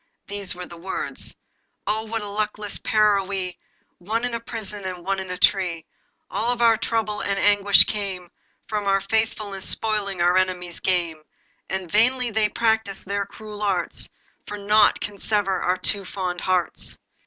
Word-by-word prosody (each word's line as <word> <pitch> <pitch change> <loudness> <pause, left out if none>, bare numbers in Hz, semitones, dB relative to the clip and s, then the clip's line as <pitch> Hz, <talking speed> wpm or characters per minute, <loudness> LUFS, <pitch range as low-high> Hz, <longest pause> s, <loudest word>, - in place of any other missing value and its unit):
These 200 -3 -3
were 180 0 -6
the 170 - -11
words: 190 +3 -2 0.5
'Oh! 220 +1 -1
what 225 0 -3
a - - -5
luckless 210 0 -2
pair 215 -2 +4
are - - -2
we, 190 -2 -4 0.4
One 220 +7 -1
in 245 - -3
a 230 - -1
prison, 215 -3 -6
and 180 -2 -5
one 195 0 0
in 190 -1 -6
a 180 - -3
tree. 180 -5 +2 0.4
All 235 +4 -1
our 230 -1 +6
trouble 220 -2 -1
and 200 -1 -1
anguish 205 0 +7
came 190 -4 -4 0.3
From 210 -2 -2
our 195 0 +4
faithfulness 215 -3 -1
spoiling 205 -4 +1
our 175 +1 +4
enemies' 180 -2 -1
game. 170 -4 0 0.5
But 190 -3 -3
vainly 250 +3 +3
they 215 -1 +2
practice 220 -3 0
their 200 +1 -2
cruel 210 -1 -9
arts, 200 -3 -1 0.4
For 210 - -5
nought 210 +1 +4
can 205 -1 -5
sever 200 -3 +1
our 180 +1 +1
two 200 +1 +1
fond 180 -2 -3
hearts. 185 -2 -1
200 Hz, 165 wpm, -24 LUFS, 185-215 Hz, 0.5 s, anguish